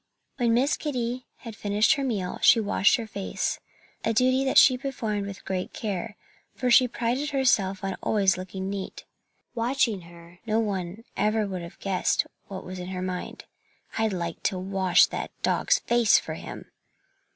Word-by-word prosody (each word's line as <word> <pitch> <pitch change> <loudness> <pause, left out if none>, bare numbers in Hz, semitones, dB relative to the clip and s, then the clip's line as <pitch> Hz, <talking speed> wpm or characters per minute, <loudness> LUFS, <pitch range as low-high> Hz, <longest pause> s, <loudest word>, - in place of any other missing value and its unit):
When 235 -3 +2
Miss 270 +5 +2
Kitty 250 -4 -3
had 230 -2 -8
finished 210 +6 +2
her 280 -3 -2
meal 205 -9 -2
she 230 - +7
washed 205 -1 +3
her 230 - -4
face 200 -3 -3 0.4
a 225 - +1
duty 255 +3 +3
that 265 - +1
she 255 - +8
performed 225 -6 -3
with 195 -3 -9
great 185 -1 -3
care, 210 0 -4 0.4
for 250 -1 0
she 250 +1 +7
prided 245 +5 -1
herself 210 -9 +1
on 195 -1 -2
always 195 -3 +2
looking 190 +1 -6
neat. 195 -1 -5 0.5
Watching 235 -4 0
her, 170 +1 -15
no 220 +1 +2
one 190 -5 -2
would 225 +2 -18
ever 210 -2 0
have 170 0 -10
guessed 190 -2 +1 0.2
what 190 -1 -7
was 185 0 -7
in 180 - -6
her 185 -1 -4
mind. 185 -1 -5 0.5
"I'd 220 -1 +2
like 170 -3 -4
to 190 - +1
wash 190 -1 +3
that - - -5
dog's - - +3
face 235 -2 +4
for - - -4
him!" - - -9
210 Hz, 170 wpm, -26 LUFS, 190-240 Hz, 0.5 s, she